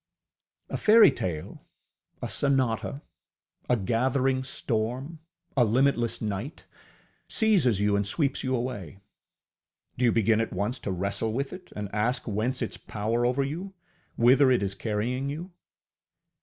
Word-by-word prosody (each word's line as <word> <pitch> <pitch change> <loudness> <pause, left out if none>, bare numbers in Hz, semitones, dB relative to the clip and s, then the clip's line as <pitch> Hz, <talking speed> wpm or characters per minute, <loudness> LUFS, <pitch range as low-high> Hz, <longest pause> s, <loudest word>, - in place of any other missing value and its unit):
A - - -2
fairytale, 135 - +3 0.6
a - - -1
sonata, 135 0 0 0.7
a 125 - +4
gathering 130 +5 +1
storm, 130 +5 -3 0.4
a 130 - +5
limitless 120 0 +1
night, 105 +8 -4 0.6
seizes 180 - +3
you 105 0 +2
and 100 0 0
sweeps 140 - 0
you 130 0 0
away: 110 -9 -4 1.0
do 125 - +3
you 120 - +5
begin 110 0 +3
at 115 - -2
once 105 +7 -2
to 100 - -4
wrestle 100 +4 -1
with 135 +3 -2
it 185 0 -11
and 105 -1 -4
ask 115 +6 0
whence 120 +5 -1
its 115 - -4
power 115 +3 -1
over 130 +3 +1
you, 175 +8 -5 0.4
whither 130 +3 +5
it 125 -5 +3
is 100 0 -1
carrying 115 +6 -2
you? 165 +6 -6
120 Hz, 135 wpm, -27 LUFS, 105-135 Hz, 1.0 s, a